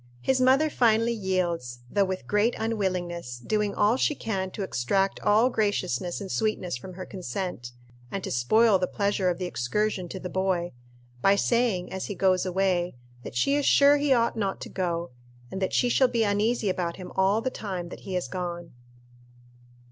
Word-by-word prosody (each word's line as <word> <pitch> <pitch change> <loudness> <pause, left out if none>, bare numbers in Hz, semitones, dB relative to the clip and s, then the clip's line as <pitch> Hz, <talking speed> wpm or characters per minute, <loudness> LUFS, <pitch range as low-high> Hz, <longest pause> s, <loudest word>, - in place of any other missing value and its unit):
His 260 - +1
mother 270 +4 +4
finally 230 -2 +3
yields, 175 - -2
though 200 +9 +2
with 185 0 -4
great 210 +3 +2
unwillingness, 180 - -2
doing 210 - -1
all 210 +4 +3
she 300 - +1
can 195 -7 -3
to 200 +2 -5
extract 190 +5 0
all 225 +5 +3
graciousness 185 - -1
and 195 -2 -6
sweetness 215 - -1
from 180 +10 -9
her 185 +1 -7
consent, 180 -7 -5 0.4
and 195 +5 -4
to - - -4
spoil 200 - +4
the 180 - 0
pleasure 200 -2 0
of 175 - -1
the 185 - -3
excursion 180 +5 -1
to 190 - -6
the 180 - -5
boy, 180 -1 -1 0.5
by 195 +1 +5
saying 225 -5 +1
as 190 - -3
he 205 - -5
goes 185 0 +2
away, 180 -2 0 0.3
that 120 - -9
she 275 - +2
is 290 0 +1
sure 285 +1 +6
he 290 -1 0
ought 235 -2 +3
not 200 -4 -2
to - - -6
go, 170 -3 -2 0.4
and 190 - -5
that 190 - 0
she 245 - +2
shall 260 +2 +4
be 235 -2 +1
uneasy 210 +2 +1
about 180 -2 -1
him 185 -1 -9
all 195 +3 +3
the 260 +3 -2
time 185 -7 -5
that - - -9
he 190 - -6
is 180 - -1
gone. 175 -2 -5
190 Hz, 185 wpm, -26 LUFS, 180-220 Hz, 0.5 s, sure